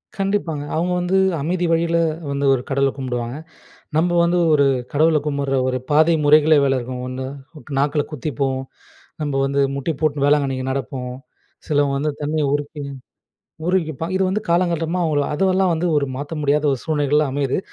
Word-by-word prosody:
கண்டிப்பாங்க, 195 -7 -1
அவுங்க 175 +3 0
வந்து 180 +2 +1 0.2
அமைதி 175 +3 -1
வழியில 170 0 +2 0.3
வந்து 140 0 -1
ஒரு 125 - 0
கடவுள 135 0 +2
கும்பிடுவாங்க. 125 0 -3 0.6
நம்ப 175 +2 +2
வந்து 175 +1 +2 0.2
ஒரு 140 -1 +4 0.3
கடவுள 155 +2 +4
கும்பிடுற 140 -2 -1
ஒரு 130 - 0
பாதை 160 +3 +5
முறைகளே 155 +1 +6
வேற 135 -1 +2
இருக்கும். 125 +1 -6
1 130 +1 -5 0.5
நாக்குல 145 +1 +1
குத்திப்போம், 135 -2 -2 0.6
நம்ப 145 -2 -2
வந்து 140 +1 +1
முட்டி 140 +4 -2
போட்டு 145 -2 +1
வேளாங்கண்ணிக்கு 135 -3 +1
நடப்போம், 130 -1 -4 0.5
சிலவங்க 145 -2 +1
வந்து 150 +1 0
தன்னையே 150 0 0
உருக்கி 145 0 -3 0.8
உருகிப்பான். 165 -2 -1
இது 190 - +1
வந்து 200 +3 0
காலங்காலமா 170 0 +1
உள்ள 145 -1 +2
அதுவெல்லாம் 190 +2 +2
வந்து 170 +2 -1
ஒரு 140 -1 +1
மாத்த 145 +3 -5
முடியாத 145 +1 +1
ஒரு 130 - -2
சூழ்நிலைகளா 150 -1 +1
அமையுது. 140 -1 0
145 Hz, 150 wpm, -21 LUFS, 140-165 Hz, 0.8 s, முறைகளே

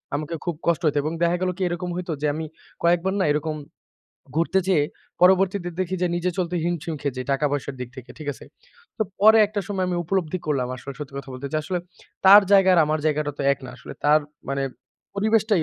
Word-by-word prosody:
আমাকে 155 +3 -3
খুব 175 -2 -1
কষ্ট 170 -1 +2
হইত। 150 - +2
এবং 155 +2 -2
দেখা 170 +1 +2
গেল 185 - +1
কি - - -7
এরকম 175 +1 -3
হইত 180 0 -5
যে 150 - +1
আমি 160 +2 -4 0.4
কয়েকবার 175 +2 +2
না 190 - +2
এরকম 155 +1 -2 0.8
ঘুরতে 170 +3 +2
যেয়ে 160 -6 +4 0.4
পরবর্তীতে 185 0 +4
দেখি 185 0 -1
যে - - +3
নিজে 175 +1 0
চলতে 180 -1 -1
হিমশিম 170 -1 -2
খেয়ে 140 -3 -2
যাই 130 - -4
টাকা 135 +2 0
পয়সার 140 -1 -3
দিক 125 - -4
থেকে। 130 -2 -10
ঠিক 155 -2 -7
আছে? - - -13 0.5
তো - - +3 0.2
পরে 220 +2 +7
একটা 205 0 -3
সময় 195 -2 -1
আমি 180 - -1
উপলব্ধি 185 0 -1
করলাম 135 -5 0
আসলে 130 +3 -8
সত্যি 145 -2 -8
কথা 140 0 -9
বলতে। 130 +2 -6
যে - - +1
আসলে 180 +3 -2 0.5
তার 200 +2 +10
জায়গা 195 -1 +6
আর 170 - +5
আমার 155 +1 0
জায়গাটা 150 -1 0
তো - - -2
এক - - -4
না - - -7
আসলে। - - -10
তার 150 +1 +5 0.3
মানে 140 0 -1 0.5
পরিবেশটাই 215 -2 +2
170 Hz, 215 wpm, -24 LUFS, 150-185 Hz, 0.8 s, তার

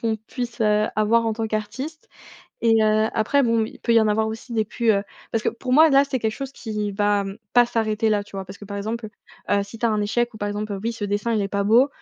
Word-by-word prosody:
qu'on 225 -1 0
puisse, 235 +3 -6
heu, 210 0 +3
avoir 225 +2 +3
en 220 - 0
tant 225 0 -2
qu'artiste. 225 +9 -5 0.5
Et, 225 -1 +4
heu, 215 0 +3
après 275 +5 +2
bon 230 -1 +2
il - - -9
peut 235 - +1
y 230 - +7
en 220 - +2
avoir 220 +1 +1
aussi 225 +3 -6
des 220 -2 +1
plus, 230 +2 0
heu 200 -2 +2 0.3
parce 225 - -1
que - - +3
pour 250 +2 -4
moi 315 +4 +7
là 275 0 +6
c'est 270 -2 -2
quelque 220 -2 -1
chose 275 -1 -5
qui 215 -5 -4
va 205 0 +1 0.3
pas 245 0 +6
s'arrêter 220 -1 0
là, 205 -1 +1
tu 200 - -11
vois? 190 - -4
Parce 190 +2 -11
que - - -10
par 200 0 -6
exemple, 220 +2 -4 0.4
heu, 200 0 +3
si 200 +3 -10
tu 235 - +1
as - - +2
un 215 -1 0
échec 240 +3 0
ou - - -10
par 205 0 -2
exemple, 205 0 -4
heu, 195 - -4
oui 230 - -1
ce 225 -2 -5
dessin 205 +3 -1
il 215 - +1
est 195 - -1
pas 200 +1 -1
beau. 235 +7 +5
220 Hz, 280 wpm, -23 LUFS, 210-235 Hz, 0.5 s, y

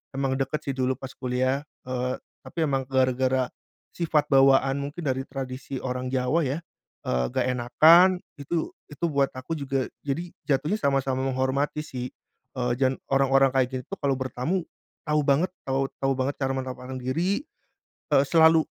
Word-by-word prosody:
Emang 135 -1 0
deket 135 +3 -1
sih 135 - -1
dulu 130 0 +1
pas 130 -1 -7
kuliah. 130 +2 0 0.2
Eee, 125 0 -2 0.2
tapi 165 - -3
emang 135 -1 0
gara-gara 130 -1 +2 0.5
sifat 155 -3 +1
bawaan 135 0 +5
mungkin 145 +5 -5
dari 130 0 0
tradisi 135 0 -5
orang 125 0 -3
Jawa 130 +5 +1
ya. 140 +5 -1 0.5
Eee, 60 0 +1
nggak 130 -1 0
enakan 160 +9 +6 0.3
itu, 160 +4 -2 0.2
itu 150 +4 -2
buat 140 -2 +2
aku 130 +6 -5
juga 135 -2 -1 0.2
jadi 165 +5 -3 0.2
jatuhnya 150 +7 +2
sama-sama 135 -1 +1
menghormati 135 +3 0
sih. 125 -3 -5 0.5
Eee, 125 -1 0
dan 130 0 +2 0.2
orang-orang 135 0 +4
kayak 130 -2 +4
gitu 130 - -3
tuh - - -36
kalau 140 -1 +2
bertamu 130 +8 -1 0.4
tahu 150 0 +3
banget, 145 +6 +3 0.2
tahu 135 0 +1
tahu 135 - +2
banget 135 +2 -1
cara 135 0 +1
menempatkan 130 0 -5
diri. 175 - 0 0.7
Eee, 135 0 +6
selalu 160 0 +6
135 Hz, 155 wpm, -26 LUFS, 130-145 Hz, 0.7 s, enakan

